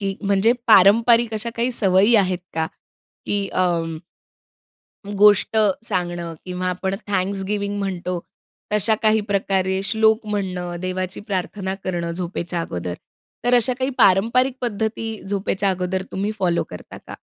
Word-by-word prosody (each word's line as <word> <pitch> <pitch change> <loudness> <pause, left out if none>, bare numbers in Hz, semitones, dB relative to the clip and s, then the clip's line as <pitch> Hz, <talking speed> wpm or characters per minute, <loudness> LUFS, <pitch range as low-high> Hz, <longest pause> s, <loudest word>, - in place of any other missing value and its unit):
की 195 -1 -2
म्हणजे 200 +3 +3
पारंपारिक 230 +3 +5
अशा 225 +2 -3
काही 240 +2 0
सवयी 195 +1 +3
आहेत 185 -3 +2 0.2
का? 160 0 0 0.6
की 200 -1 -1
अं 165 -3 0 1.1
गोष्ट 205 +1 +4 0.3
सांगणं 175 -4 -3
किंवा 180 0 -4
आपण 190 +2 -2
थँक्सगिव्हिंग 200 +1 -1
म्हणतो, 180 -2 -3 0.5
तशा 210 +1 +3
काही 220 0 +4
प्रकारे 190 -1 0
श्लोक 220 +1 +2
म्हणणं, 185 -4 -3
देवाची 185 0 -3
प्रार्थना 190 -1 -3
करणं 170 -2 -2
झोपेच्या 175 0 -4
अगोदर, 90 - -4 0.5
तर 245 0 +3
अशा 245 +1 +3
काही 260 +1 0
पारंपरिक 235 +7 +4
पद्धती 225 -1 -2 0.2
झोपेच्या 195 0 0
अगोदर 185 0 -2
तुम्ही 200 +3 -1
फॉलो 175 -3 +1
करता 90 - -10
का? - - -8
195 Hz, 130 wpm, -21 LUFS, 180-215 Hz, 1.1 s, पारंपारिक